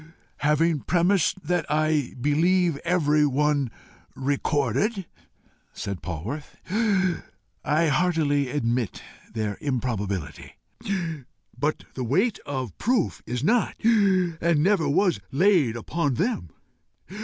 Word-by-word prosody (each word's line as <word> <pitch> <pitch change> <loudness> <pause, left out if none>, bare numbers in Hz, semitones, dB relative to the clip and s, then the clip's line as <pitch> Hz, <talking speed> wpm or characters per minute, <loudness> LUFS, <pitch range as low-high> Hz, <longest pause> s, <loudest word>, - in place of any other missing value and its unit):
"Having 150 +1 +2
premised 185 +3 +1
that 175 0 +1
I 155 -2 +1
believe 165 +4 +2
every 155 -3 +2
one 145 -1 +1 0.5
recorded," 145 - 0 0.7
said 100 -3 -5
Polwarth, 100 - -6 1.1
"I 155 +3 +2
heartily 150 -3 +1
admit 120 -4 -1 0.3
their 110 -2 -3
improbability. 115 - -3 1.0
But 150 +2 -1
the 130 - -4
WEIGHT 190 - +1
of 130 -9 -4
proof 235 -5 0
is 125 +1 -3
not, 225 +8 +2
and 180 -8 +3
never 185 -6 +2
was 175 - +2
laid 155 - +3
upon 145 +3 -1
them. 180 - -1
150 Hz, 95 wpm, -25 LUFS, 130-180 Hz, 1.1 s, and